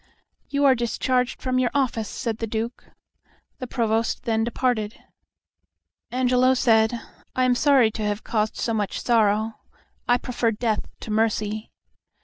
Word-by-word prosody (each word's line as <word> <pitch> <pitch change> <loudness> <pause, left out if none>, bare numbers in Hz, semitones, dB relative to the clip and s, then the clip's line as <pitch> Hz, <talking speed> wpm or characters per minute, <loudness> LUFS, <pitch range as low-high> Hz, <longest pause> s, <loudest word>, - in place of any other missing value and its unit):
"You 285 0 +1
are 270 - +7
discharged 250 +1 -1
from 255 -1 +1
your 250 -1 +2
office," 235 -6 0
said 225 -2 -4
the 225 - -2
Duke. 225 +2 -4 0.7
The 255 - -5
Provost 225 -2 0
then 225 -3 +1
departed. 235 -2 -1 1.1
Angelo 255 +1 +3
said, 225 -1 +3 0.4
"I 255 - +2
am 255 0 +4
sorry 260 -3 +4
to 220 - -6
have 210 0 -2
caused 215 -1 -1
such 215 -4 -1
sorrow. 220 -1 +1 0.5
I 245 - +4
prefer 245 -1 -1
death 220 -1 -1
to 220 - -6
mercy." 215 0 0
230 Hz, 135 wpm, -24 LUFS, 220-250 Hz, 1.1 s, are